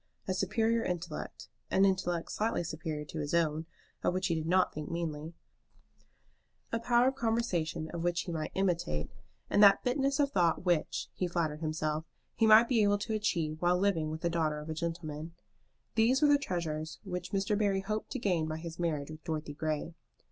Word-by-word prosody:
A 190 - +1
superior 225 +5 +1
intellect, 175 -3 -4 0.2
an 195 - +4
intellect 180 -3 0
slightly 215 -4 0
superior 155 -2 -4
to 155 - -6
his 150 +2 -1
own, 160 -1 +1 0.3
of 180 - +1
which 185 - 0
he - - +2
did 160 -1 -2
not 185 +1 +3
think 150 -1 -5
meanly, 165 -1 -4 1.4
a 230 - 0
power 240 +2 +4
of - - -4
conversation 180 -10 -1
which 175 0 0
he 175 - -5
might 155 -2 -3
imitate, 175 - 0 0.4
and - - +3
that 200 -1 +7
fineness 275 +2 +1
of 280 -1 +3
thought 175 -3 +2
which, 175 -4 +1
he 180 - -1
flattered 165 -3 -1
himself, 155 -1 -1 0.3
he 225 - +3
might 220 +2 +8
be 235 -3 +3
able 205 0 +4
to 215 +2 -3
achieve 165 -7 -1
while 175 0 +3
living 180 -5 +1
with 155 +1 -5
the 170 - +1
daughter 155 -3 0
of 150 +1 -6
a - - -1
gentleman, 165 -1 -4 0.6
these 235 +4 +4
were 300 - +5
the 290 0 +5
treasures 160 - -3
which 180 -3 -5
Mr. 200 +1 +1
Barry 200 -2 +1
hoped 215 +2 -3
to - - -2
gain 180 -9 0
by 155 0 -3
his 165 0 -8
marriage 155 -4 -1
with 155 0 -10
Dorothy 155 -3 -3
Grey. 155 +2 -2
175 Hz, 190 wpm, -31 LUFS, 155-205 Hz, 1.4 s, might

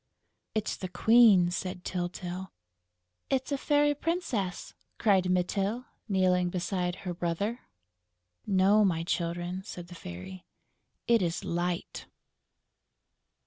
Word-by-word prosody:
"It's 215 -1 -1
the 185 - -4
Queen!" 215 -5 +6
said 180 0 -4
Tyltyl. 180 +1 -4 0.8
"It's 265 +1 0
a - - +2
Fairy 290 0 +3
Princess!" 285 - -2 0.2
cried 190 -4 +3
Mytyl, 195 +6 0 0.2
kneeling 180 -2 +3
beside 180 0 -1
her 180 - -2
brother. 180 +7 -2 0.9
"No, 200 +2 +4
my 165 -4 +1
Children," 175 +2 -2
said 175 -3 -8
the - - -9
Fairy. 170 - -8 0.6
"It 235 -1 +4
is 170 -1 -1
Light!" 175 0 -3
185 Hz, 105 wpm, -29 LUFS, 175-215 Hz, 0.9 s, Queen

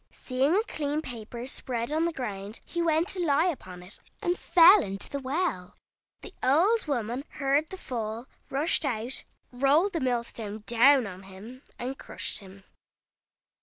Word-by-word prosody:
Seeing 270 +6 0
a 425 - +3
clean 300 -6 -2
paper 235 -1 -7
spread 245 -1 -4
on 320 +2 +1
the 340 - 0
ground, 210 -7 -5
he 345 - -3
went 325 +1 +2
to 365 -2 -1
lie 305 +1 +3
upon 185 - -4
it, 185 +4 -8 0.2
and 350 0 0
fell 360 +3 +7
into 195 -6 -4
the 280 - -4
well. 270 - -2 0.4
The 405 - -10
old 345 - +3
woman 245 -1 -2
heard 280 +2 +1
the 380 - -7
fall, 230 -6 -4 0.2
rushed 300 +5 +2
out, 245 -2 -2 0.3
rolled 285 +10 +3
the 335 - 0
mill 250 -4 0
stone 215 -2 -7
down 255 +2 +5
on 185 -2 -8
him, 195 +7 -11 0.2
and 260 +3 -5
crushed - - -6
him. 195 0 -14
265 Hz, 165 wpm, -28 LUFS, 225-315 Hz, 0.4 s, fell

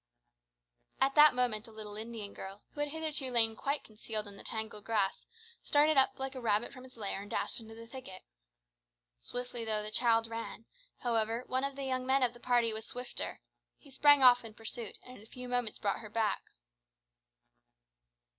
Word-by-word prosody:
At 270 +1 +3
that 300 -2 +8
moment 235 -4 +1
a - - -12
little 215 -1 -8
Indian 220 -2 -6
girl, 195 +2 -8
who - - -11
had 295 0 0
hitherto 305 -3 0
lain 225 -2 +4
quite 280 +5 -1
concealed 215 0 -5
in 200 - -8
the - - -10
tangled 220 -2 -4
grass, 210 -4 0 0.3
started 300 +1 +4
up 265 -1 +4
like 270 0 -4
a 260 - -6
rabbit 220 +1 +1
from 255 -1 -11
its 255 -2 -15
lair 200 -2 -3
and 205 - -10
dashed - - 0
into 225 -1 -10
the 230 0 -10
thicket. 230 -6 -9 1.0
Swiftly 245 - -5
though 215 -1 0
the 210 - -4
child 230 0 +3
ran, 230 0 -6 0.4
however, 230 -1 0
one 260 +1 0
of 275 0 -2
the 275 - -5
young 255 -1 -1
men 265 0 +4
of 240 -1 +2
the 240 - -14
party 240 -2 +2
was 220 0 -5
swifter. 250 0 -4 0.4
He 280 - -18
sprang 290 +1 +6
off 245 -1 +8
in 220 -2 -10
pursuit, 225 0 -6
and 255 0 -11
in - - -14
a - - -16
few 250 +1 -8
moments 245 -3 0
brought 200 -1 -1
her 215 - -9
back. 215 -2 0
230 Hz, 195 wpm, -33 LUFS, 215-255 Hz, 1.0 s, that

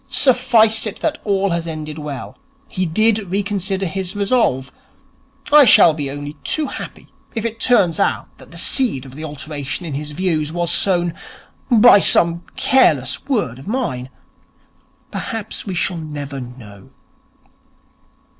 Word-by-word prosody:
Suffice 230 -4 +3
it 210 - -6
that 315 - -1
all 200 -2 0
has 170 0 -2
ended 155 -1 -6
well. 145 -3 -7 0.3
He 185 -2 -2
did 215 +6 +2
reconsider 195 0 -2
his 190 +2 -4
resolve. 200 - 0 0.8
I 300 -1 +9
shall 175 -7 +7
be 145 -3 -4
only 145 +1 -6
too 310 - 0
happy - - -8 0.3
if 225 0 -3
it 230 0 -4
turns 200 -11 +3
out - - -1
that - - -15
the - - -12
seed 225 - +1
of 130 - -12
the 155 +3 -8
alteration 150 +1 -6
in 155 - -5
his 145 +2 -5
views 160 -3 -1
was 170 0 -2
sown 175 -3 +1 0.6
by 235 -3 +7
some 170 -2 +4
careless 155 - +2
word 205 - -1
of 135 - -13
mine. 200 - -3 1.0
Perhaps 225 -1 -6
we 190 - -3
shall 175 +1 -1
never 145 -3 -6
know.' 115 -6 -12
175 Hz, 145 wpm, -19 LUFS, 145-215 Hz, 1.0 s, I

